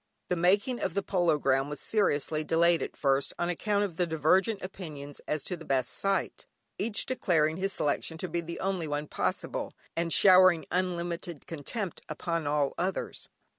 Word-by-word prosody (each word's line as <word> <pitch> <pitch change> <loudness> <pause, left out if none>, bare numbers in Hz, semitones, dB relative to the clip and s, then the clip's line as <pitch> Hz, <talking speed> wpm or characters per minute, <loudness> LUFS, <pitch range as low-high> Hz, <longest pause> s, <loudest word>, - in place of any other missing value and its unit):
The 180 - +2
making 200 +9 +2
of 180 - -2
the 200 - 0
polo 175 -6 +2
ground 135 0 +1
was 150 - -5
seriously 155 -7 +1
delayed 170 +1 +3
at - - -5
first 135 0 +1
on 175 - -1
account 205 +4 0
of 175 -5 -7
the 180 - +1
divergent 185 +7 +2
opinions 150 -7 -8
as 150 -2 -1
to 180 - -4
the 165 - -11
best 130 -4 0
site, 195 0 -1 0.3
each 220 -2 0
declaring 165 -10 +1
his 195 +1 -1
selection 160 -1 0
to 185 - -4
be 170 0 -2
the 170 0 -7
only 190 -4 -1
one 145 0 -2
possible, - - -2 0.2
and 170 0 -1
showering 185 -3 +6
unlimited 175 -2 -2
contempt 170 - -5
upon 165 0 -2
all 145 -1 +1
others. 185 +2 -3
170 Hz, 170 wpm, -29 LUFS, 150-185 Hz, 0.3 s, showering